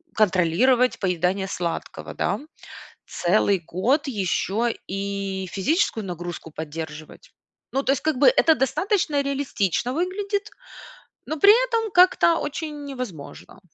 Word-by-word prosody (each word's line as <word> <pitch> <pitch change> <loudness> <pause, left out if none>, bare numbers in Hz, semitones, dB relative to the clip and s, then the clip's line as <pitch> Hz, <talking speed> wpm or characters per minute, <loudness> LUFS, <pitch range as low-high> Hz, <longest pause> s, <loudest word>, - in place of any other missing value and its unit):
контролировать 215 +6 +3
поедание 185 +1 0
сладкого, 170 -3 -5
да, 195 +5 -1 0.7
целый 190 +1 +1
год 245 - 0
еще 220 +1 -1
и 195 -1 -3
физическую 225 - 0
нагрузку 175 -2 -6
поддерживать. 155 0 -8 0.4
Ну, 270 +1 0
то 270 - +3
есть 275 - -2
как 310 -5 0
бы - - +5
это 330 -10 +5
достаточно 305 - 0
реалистично 260 - -1
выглядит, 400 +5 -2 0.8
но 315 - -4
при 400 +6 +8 0.2
этом 450 -3 -1
как-то 355 -2 +5
очень 295 0 -5
невозможно. 205 - -8
235 Hz, 115 wpm, -23 LUFS, 185-300 Hz, 0.8 s, при